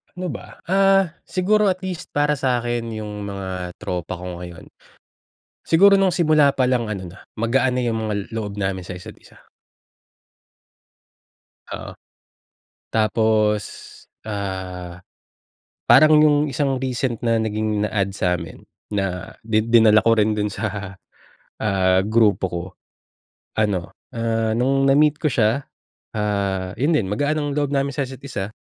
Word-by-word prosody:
Ano 180 0 -4
ba? - - -10
Ah, 195 -2 +4 0.2
siguro 210 +3 +2
at 185 -1 -1
least 180 -1 -6
para 145 0 +2
sa'kin 120 -3 -1
'yung 105 -1 -6
mga 95 -3 -5
tropa 90 0 -4
ko 90 0 -7
ngayon. 85 -1 -10 1.0
Siguro 200 +5 +6
nung 195 -2 +2
simula 155 -5 +4
palang 125 -2 +1
ano 95 -3 -5
na, 95 - -14 0.2
magaan 125 +2 +1
na - - 0
'yung 115 -1 0
mga 110 -1 -2 0.2
loob 105 -2 -4
namin 95 -2 -2
sa 95 - -6
isa't 90 - -11
isa. - - -20 2.3
Oo. - - -7 1.0
Tapos, 110 -1 +2 0.6
ah, 95 -4 -5 0.9
parang 155 0 +7
'yung 150 -1 +5
isang 135 -1 -1
recent 125 -3 -2
na 115 -1 +2
naging 110 -1 -1
na-add 100 -2 0
sa'min 90 -3 -2 0.3
na 95 -3 -3
di 110 -1 +2
dinala 110 -1 +5
ko 115 0 +3
rin 110 0 +3
dun 105 0 -1
sa, 100 -1 -5 0.6
ah, 95 -3 +2
grupo 110 -2 +3
ko, 85 -1 -4 1.0
ano, 100 -5 0 0.2
ah, 115 -1 0
nung 135 +3 +2
na-meet 150 +2 +4
ko 155 - +2
siya, 125 +1 +1 0.5
ah, 100 -3 -1
'yun 145 +8 +2
din, 115 -11 +1
magaan 145 +9 0
ang 145 - -2
loob 145 -1 0
namin 140 0 +1
sa 140 - -1
isa't 130 0 -10
isa, 110 -7 -5
110 Hz, 135 wpm, -21 LUFS, 100-135 Hz, 2.3 s, parang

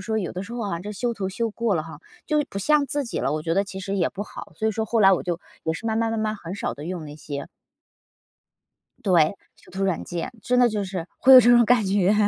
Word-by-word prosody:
说 220 -1 -1
有 185 -5 -3
的 185 - -5
时 225 +4 -9
候 240 -1 -4
啊， 170 -3 -3
这 205 +3 -6
修 235 +3 -2
图 195 -3 -3
修 225 +4 -2
过 220 -2 0
了 155 - -2
哈， 165 - -10 0.3
就 300 -1 +2
不 195 - -4
像 295 +8 +3
自 285 +1 -1
己 235 - -4
了， 135 - 0
我 155 0 -2
觉 165 +1 -1
得 195 - +3
其 190 -1 -8
实 195 +1 -3
也 175 -4 +2
不 200 - -5
好。 - - -10
所 220 - -1
以 - - -1
说 220 +1 -1
后 230 +1 0
来 195 -1 +7
我 180 - +1
就 175 -2 -2 0.3
也 160 - 0
是 195 +8 -6
慢 220 -1 0
慢 225 0 +1
慢 225 - -2
慢 215 0 -1
很 175 -2 -7
少 - - -3
地 145 - -9
用 175 -2 -5
那 145 -1 -9
些。 145 -2 -6 1.6
对， 180 -5 +5 0.3
修 - - -20
图 195 +1 -2
软 190 -3 0
件， 175 -1 -4
真 250 0 +1
的 245 -1 +6
就 210 -3 -2
是 185 -3 -5
会 265 - +6
有 255 - +12
这 240 - +5
种 240 0 +7
感 235 -2 +3
觉。 195 +1 +2
200 Hz, 300 characters per minute, -24 LUFS, 180-230 Hz, 1.6 s, 有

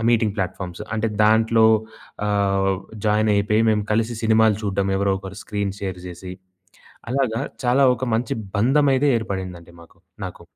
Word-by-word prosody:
Meeting 110 -3 +2
platforms. 95 0 -4
అంటే 110 +1 0 0.2
దాంట్లో 110 +1 +4 0.6
ఆహ్, 100 -1 +1 0.3
జాయినయిపోయి 105 0 +2
మేము 105 -1 0
కలిసి 115 +2 0
సినిమాలు 110 -2 +4
చూడడం 100 -1 -1
ఎవరో 100 0 +1
ఒకరు 95 +1 -9
స్క్రీన్ 100 -2 -3
షేర్ 95 -2 -4
జేసి. 90 +1 -8 0.8
అలాగా 130 -2 0 0.2
చాలా 130 +3 +4
ఒక - - -3
మంచి 115 0 -2 0.3
బంధమైతే 135 +3 +3
ఏర్పడిందండి 95 -5 -6
మాకు 85 +3 -20 0.3
నాకు. 90 - -8
105 Hz, 130 wpm, -22 LUFS, 95-115 Hz, 0.8 s, దాంట్లో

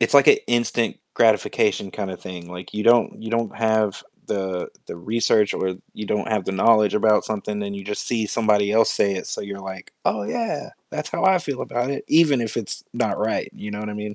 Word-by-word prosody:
it's, 115 +4 +2
like, 140 - +8
a - - +6
instant 120 -1 +1 0.2
gratification, 95 - +2
kinda, 95 -2 -4
thing. 90 -2 -9
Like, 90 0 -9
you 105 - -1
don't 115 0 +3
you 110 - -5
don't 115 -2 -1
have 110 -3 +1 0.2
the 95 -2 -2 0.2
the - - -7
research, 105 +2 +2
or 95 -1 -1 0.2
you 105 - -6
don't 105 0 -1
have 105 -4 0
the 95 - -2
knowledge 105 +1 +4
about 105 0 +4
something, 105 -1 -3
and 100 0 -4
you 100 - -7
just 105 +1 -4
see 115 -3 0
somebody 105 -2 +2
else 110 0 +4
say 100 -1 +2
it, 90 - -5
so - - -4
you're 100 -1 -6
like, 95 -1 -8
"Oh 105 - +1
yeah, 230 - -3 0.2
that's - - -4
how - - -2
I 190 -1 +5
feel 140 -6 -4
about 120 +2 -2
it," 140 - -4
even 155 -5 +5
if 115 -2 -3
it's 115 -4 -4
not - - 0
right, - - -1
you 105 - -7
know 105 - -4
what 105 - -5
I - - -6
mean? 105 0 -5
105 Hz, 225 wpm, -23 LUFS, 100-115 Hz, 0.2 s, like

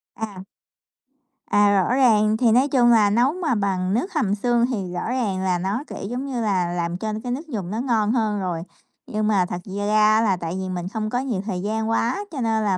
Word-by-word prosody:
À. 205 -4 -6 1.0
À, 205 -2 +4
rõ 245 - 0
ràng. 220 -5 +4
Thì 230 -1 +3
nói 255 +5 +4
chung 245 -3 +4
là 215 -3 +5
nấu 240 +7 +2
mà 340 -8 -1
bằng 190 -2 0
nước 355 - -1
hầm 210 -10 +1
xương 240 +2 +2
thì 190 -6 -3
rõ 180 - -3
ràng 220 -7 -1
là 185 -2 +1
nó, 195 +9 -2
kiểu, - - -8
giống 250 +3 -3
như 255 -4 -3
là, 185 -5 0
làm 175 0 -2
cho 215 +2 -3
cái 245 - -3
nước 295 +7 -4
dùng 200 - -5
nó 220 - -2
ngon 225 -5 +1
hơn 220 -4 0
rồi. 175 -3 -3 0.4
Nhưng 215 0 -1
mà 195 -4 +3
thật 175 0 -5
da 205 0 -4
ra 215 0 +4
á 220 - +4
là 200 -5 +2
tại 170 0 -4
vì 190 0 -4
mình 180 -1 -4
không 215 -1 -2
có 245 +2 -1
nhiều 240 -8 -2
thời 185 -4 -3
gian 220 +2 -2
quá, 240 - 0
cho 275 -6 -4
nên 220 -1 +1
là 195 -3 +1
215 Hz, 240 wpm, -23 LUFS, 190-240 Hz, 1.0 s, là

